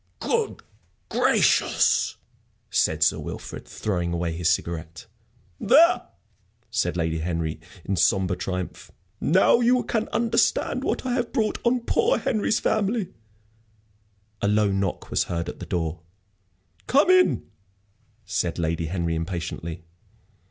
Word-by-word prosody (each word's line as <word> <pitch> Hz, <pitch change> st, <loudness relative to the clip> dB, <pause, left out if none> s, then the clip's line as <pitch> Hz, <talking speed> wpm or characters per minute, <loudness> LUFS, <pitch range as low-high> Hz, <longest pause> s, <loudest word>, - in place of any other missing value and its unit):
"Good -, -, -1 dB, 0.5 s
gracious!" -, -, +2 dB, 0.5 s
said -, -, +2 dB
Sir -, -, +2 dB
Wilfrid, -, -, -7 dB
throwing 90 Hz, -5 st, -2 dB
away 85 Hz, -1 st, -2 dB
his 85 Hz, 0 st, +1 dB
cigarette. 85 Hz, +4 st, -3 dB, 0.5 s
"There!" 330 Hz, +7 st, +5 dB, 0.7 s
said 90 Hz, -4 st, 0 dB
Lady 80 Hz, -1 st, -1 dB
Henry, 80 Hz, -1 st, -2 dB, 0.3 s
in 100 Hz, -, -1 dB
sombre 95 Hz, 0 st, +2 dB
triumph. 90 Hz, -1 st, -5 dB, 0.3 s
"Now 190 Hz, +8 st, +4 dB
you 245 Hz, +1 st, +3 dB
can 225 Hz, -1 st, -1 dB
understand 230 Hz, 0 st, +1 dB
what -, -, -2 dB
I 250 Hz, -, 0 dB
have 245 Hz, -1 st, -1 dB
brought 220 Hz, -5 st, 0 dB
on 245 Hz, +1 st, +2 dB
poor 455 Hz, -, +2 dB
Henry's 215 Hz, -1 st, 0 dB
family." 215 Hz, -1 st, 0 dB, 1.3 s
A -, -, +1 dB
low 105 Hz, -1 st, +2 dB
knock 95 Hz, -2 st, -2 dB
was -, -, +1 dB
heard 85 Hz, 0 st, -3 dB
at -, -, -7 dB
the -, -, -8 dB
door. 80 Hz, -1 st, -2 dB, 0.9 s
"Come 290 Hz, +7 st, +4 dB
in," 370 Hz, 0 st, +4 dB, 0.8 s
said 85 Hz, -3 st, -2 dB
Lady 80 Hz, -1 st, -1 dB
Henry, 85 Hz, -1 st, -2 dB
impatiently. 85 Hz, 0 st, -4 dB
95 Hz, 125 wpm, -24 LUFS, -, 1.3 s, There